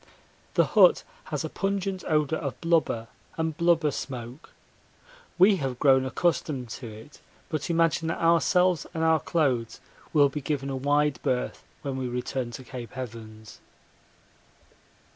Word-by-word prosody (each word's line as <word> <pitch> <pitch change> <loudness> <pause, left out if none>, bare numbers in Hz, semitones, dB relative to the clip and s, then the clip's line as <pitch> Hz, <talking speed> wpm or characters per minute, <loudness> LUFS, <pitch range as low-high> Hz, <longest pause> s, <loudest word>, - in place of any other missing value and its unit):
The - - +5
hut - - +5 0.2
has - - -3
a - - -4
pungent 195 -1 -2
odour 155 0 +1
of 140 -4 -5
blubber 165 -9 +1 0.3
and 160 -1 -1
blubber 170 -2 +3
smoke. 125 +1 -7 0.9
We 190 +2 +6
have 135 -5 -3
grown 130 -1 +4
accustomed 140 -5 -1
to 120 +1 -7
it, 110 +6 -12 0.3
but 155 -1 -3
imagine 165 -1 +2
that 165 - -1
ourselves 170 0 +3
and 160 - -1
our 160 -1 +4
clothes 130 -10 0 0.3
will 145 -3 +5
be 150 +2 -5
given 140 -1 -2
a - - -2
wide 145 +1 +1
berth 125 -1 -2 0.2
when 135 -2 -3
we 130 -1 -2
return 125 0 -3
to 130 - -7
Cape 125 -1 -9
Evans. 110 -3 -8
145 Hz, 145 wpm, -27 LUFS, 125-165 Hz, 0.9 s, We